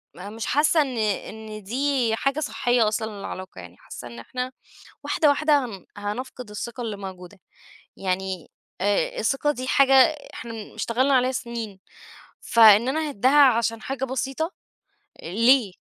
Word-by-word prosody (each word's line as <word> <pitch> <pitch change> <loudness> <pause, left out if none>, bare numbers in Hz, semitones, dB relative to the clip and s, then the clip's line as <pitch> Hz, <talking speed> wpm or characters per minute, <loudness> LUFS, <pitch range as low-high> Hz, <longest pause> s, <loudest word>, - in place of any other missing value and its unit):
م 195 +4 -9
مش 225 - -4
حاسّة 300 +3 +3
إن 265 -4 -2
إن 215 0 -3
دي 250 +1 0
حاجة 275 +5 -1
صحيّة 245 -6 +1
أصلًا 215 +1 -1
للعلاقة، 185 - -7
يعني 90 +1 -13
حاسّة 120 - -10
إن 120 0 -10
إحنا 250 - -5 0.5
واحدة، 305 - +2
واحدة، 290 -1 +3
هن 195 -6 -10
هنفقد 210 +3 -6
الثقة 235 +4 -6
اللي 220 -3 -4
موجودة، 190 0 -10 0.6
يعني 190 -2 -3 0.3
آآ 200 +1 0
الثقة 270 +6 +1
دي 255 -1 -6
حاجة 270 0 +4 0.4
إحنا 225 -2 -8
اشتغلنا 245 +6 +1
عليها 255 0 +3
سنين، 235 -6 -5 0.6
فإن 225 0 +6
أنا 310 +3 -1
أهِدّها 280 +4 +5
عشان 230 -3 +2
حاجة 265 0 -3
بسيطة، 270 +6 -3 0.7
ليه؟ 230 +3 +3
230 Hz, 140 wpm, -24 LUFS, 205-265 Hz, 0.7 s, فإن